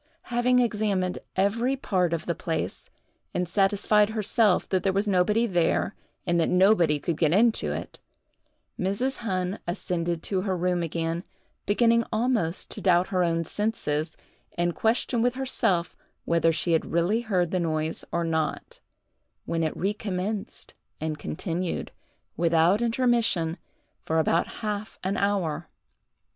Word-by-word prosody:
Having 245 +1 +3
examined 210 -6 +1 0.2
every 230 +7 +1
part 185 -9 0
of 170 -2 -2
the 170 - 0
place, 165 -1 -4 0.5
and 180 0 0
satisfied 205 +2 +3
herself 215 -2 +2
that 185 -1 +1
there 195 - +1
was 200 +2 0
nobody 205 +4 +3
there, 175 -6 +1 0.3
and 170 0 +2
that 165 - +2
nobody 180 -5 +4
could 165 +3 -2
get 155 -1 +2
into 225 +5 +3
it, - - -6 0.8
Mrs. 200 +8 -1
Hunn 185 -3 -2
ascended 175 -2 -2
to 190 -2 0
her 190 -2 -1
room 180 0 0
again, 165 +1 -2 0.4
beginning 230 +2 +4
almost 220 -7 0
to - - -3
doubt 180 -1 +3
her 185 -2 +1
own 165 -1 +1
senses, 160 -7 -2 0.4
and 175 0 +1
question 230 +3 +1
with 245 +1 +1
herself 190 -10 0 0.3
whether 165 0 +3
she 170 +2 0
had 160 - +1
really 175 +7 +2
heard 185 -7 0
the 185 - +1
noise 160 -1 -1
or 170 - 0
not, 160 -2 -2 0.7
when 165 - -1
it 155 - -2
recommenced 200 0 -3 0.3
and 155 -1 -3
continued, 175 +2 -3 0.4
without 170 +4 +3
intermission, 230 -9 +1 0.5
for 160 - -1
about 165 +1 +2 0.2
half 210 0 -3
an 190 +2 -1
hour. 175 -6 0
185 Hz, 140 wpm, -26 LUFS, 170-215 Hz, 0.8 s, nobody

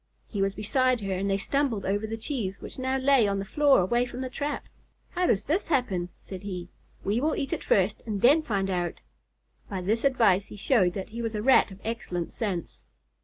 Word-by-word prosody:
He 200 - -3
was 195 0 +1
beside 255 +3 +1
her 195 -1 -2
and 195 +2 -1
they 195 - +2
stumbled 250 0 -1
over 205 +3 0
the 225 +1 -4
cheese, 220 -6 -3
which - - -8
now 260 +1 0
lay 265 -4 +4
on 200 0 0
the 195 - -3
floor 285 +2 +4
away 240 +7 +1
from 250 - -6
the 260 -1 -4
trap. 290 +3 -3 0.5
"How 360 0 +1
does 200 -1 +2
this 325 - 0
happen?" 210 - 0
said 190 -2 -9
he. 180 -3 -6 0.3
"We 210 +5 0
will 310 +2 +1
eat 275 - -2
it - - -3
first 195 +1 +2
and 210 -2 -2
then 290 +6 +6
find 195 -8 -1
out." 175 -1 -2 0.7
By 190 -2 -3
this 215 +5 0
advice 225 -8 +3
he - - -10
showed 195 -4 +2
that 190 0 -5
he 230 +2 -5
was 225 -1 -3
a 210 - -2
Rat 265 -2 +5
of 190 -1 -12
excellent 195 -7 -4
sense. 185 - -4
215 Hz, 220 wpm, -27 LUFS, 195-260 Hz, 0.7 s, then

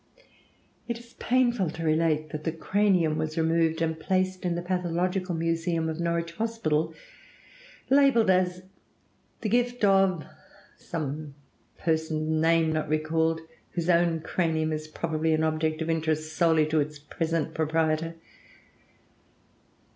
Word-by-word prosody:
It 235 -1 -2
is 235 0 -15
painful 240 -7 +2
to 165 +1 -6
relate 155 -1 +1
that 155 -1 -5
the 160 - 0
cranium 180 -2 +1
was 155 0 -3
removed 165 0 +2
and 160 0 -1
placed 185 +2 0
in 175 -2 0
the 175 - -3
pathological 180 0 -1
museum 165 0 0
of 160 +1 -4
the - - -1
Norwich 170 0 -1
Hospital, 165 -9 -1 0.9
labeled 270 -7 +5
as 180 0 +1 0.8
"the 215 - -1
gift 245 -1 +1
of" 195 -4 +3 0.5
some 150 -2 -5 0.4
person 160 -1 0
(name 165 0 +3
not 155 -1 -2
recalled), 160 +1 +1 0.3
whose 175 0 +1
own 170 -1 +2
cranium 160 -2 0
is 155 0 -4
probably 160 0 0
an 155 - 0
object 155 0 0
of 165 - -5
interest 155 -1 -1
solely 160 -3 +4
to 155 +1 +1
its 150 +1 -2
present 160 +1 -2
proprietor. 160 +1 0
165 Hz, 130 wpm, -27 LUFS, 155-180 Hz, 0.9 s, labeled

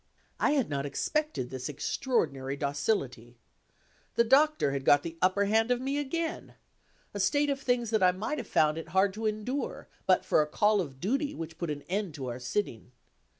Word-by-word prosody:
I - - +3
had 275 -5 +2
not 140 -1 -2
expected 295 - -2
this 130 0 -4
extraordinary 145 - -1
docility. 140 - -2 0.8
The 235 - +5
Doctor 275 - +4
had 135 -1 -3
got 145 +1 +5
the 170 -1 -6
upper 185 +2 +3
hand 220 +3 +2
of 245 -1 +2
me 275 +3 -1
again 325 +4 -3 0.6
a 205 - -4
state 285 +9 +2
of 275 0 -3
things 245 -3 0
that 220 -2 +2
I 180 -1 +6
might 215 +11 -3
have 235 - -6
found 155 +1 +2
it 165 - -8
hard 195 0 +4
to 220 +2 -2
endure, 225 +6 -3 0.2
but 185 - +4
for - - +4
a 150 - 0
call 205 +5 +2
of 135 -6 -7
duty 275 - -1
which 165 0 -7
put 170 - -2
an 145 -1 -4
end 190 -3 -3
to 135 -3 -5
our 120 +1 -5
sitting. 125 - -3
195 Hz, 195 wpm, -29 LUFS, -, 0.8 s, I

